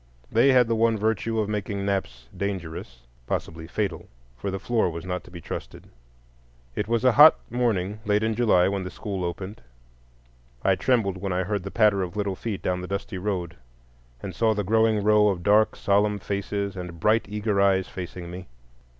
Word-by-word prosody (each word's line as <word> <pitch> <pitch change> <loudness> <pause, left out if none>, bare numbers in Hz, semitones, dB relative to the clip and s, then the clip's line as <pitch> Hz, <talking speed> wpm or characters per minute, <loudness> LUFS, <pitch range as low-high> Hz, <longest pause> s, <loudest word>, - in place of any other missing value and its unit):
They 125 +4 +5
had 125 -2 +5
the 115 - +1
one 115 0 +2
virtue 110 +1 0
of 105 - 0
making 100 -1 -3
naps 60 -12 -3
dangerous,—possibly 80 -5 -5
fatal, 90 -2 -3 0.3
for 100 - -4
the 95 - -2
floor 110 0 +1
was 85 0 -7
not 90 0 -3
to - - -13
be 85 -1 -9
trusted. - - -8 0.9
It 105 - -2
was 115 +2 0
a 130 - +7
hot 150 +6 +8
morning 105 -5 0
late 105 0 +1
in 110 0 +1
July 110 -6 +3
when 100 0 -1
the 90 - -5
school 95 0 -5
opened. 95 +4 -5 1.0
I 95 - +4
trembled 100 -3 +1
when 95 +1 -3
I 90 +1 0
heard 100 +1 -2
the 95 - -6
patter 105 -2 +3
of 90 +1 -4
little 100 -2 -1
feet 105 0 -5
down 90 0 -1
the 90 - -6
dusty 100 -1 -4
road, 90 -4 -3 0.7
and 95 - -5
saw 110 -1 +2
the 105 - -1
growing 110 +1 +2
row 105 0 +5
of 95 -4 -1
dark 105 +3 +4
solemn 105 +1 +2
faces 100 0 -3
and 90 -2 -7
bright 110 +5 +2
eager 105 -1 0
eyes 95 -1 +3
facing 90 -1 -7
me. 90 +1 -8
100 Hz, 185 wpm, -25 LUFS, 90-110 Hz, 1.0 s, hot